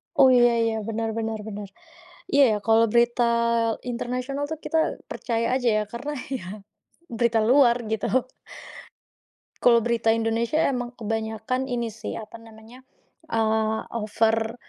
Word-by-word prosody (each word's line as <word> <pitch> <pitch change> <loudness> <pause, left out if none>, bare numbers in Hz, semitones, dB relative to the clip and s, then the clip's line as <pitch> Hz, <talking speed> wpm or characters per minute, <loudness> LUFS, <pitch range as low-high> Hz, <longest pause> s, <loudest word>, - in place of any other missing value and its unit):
Oh, 260 -1 +6
iya 240 -1 +5
iya, 225 -1 0
benar 225 0 -2
benar 225 -1 -3
benar. 205 -1 -6 0.6
Iya, 280 0 +4
ya, - - +1
kalau 225 +1 +5
berita 240 0 +3 0.6
internasional 250 +3 -4
tuh 315 -1 -5
kita 320 -1 0
percaya 230 +1 -1
aja 250 -2 0
ya, - - +1
karena 270 +5 -5 0.2
ya, 260 -9 -4 0.7
berita 235 -1 +2
luar 255 -3 +5
gitu, 220 -1 -2 1.5
kalau 235 -1 +5
berita 235 -1 0
Indonesia 230 +6 0
emang 245 -1 -4
kebanyakan 225 +3 -3
ini 240 -2 -2
sih, 225 - -7
apa 220 +1 -9
namanya, 225 +2 -15 0.5
eee, 220 -2 +1 0.3
over 225 +2 0
230 Hz, 130 wpm, -24 LUFS, 225-245 Hz, 1.5 s, Oh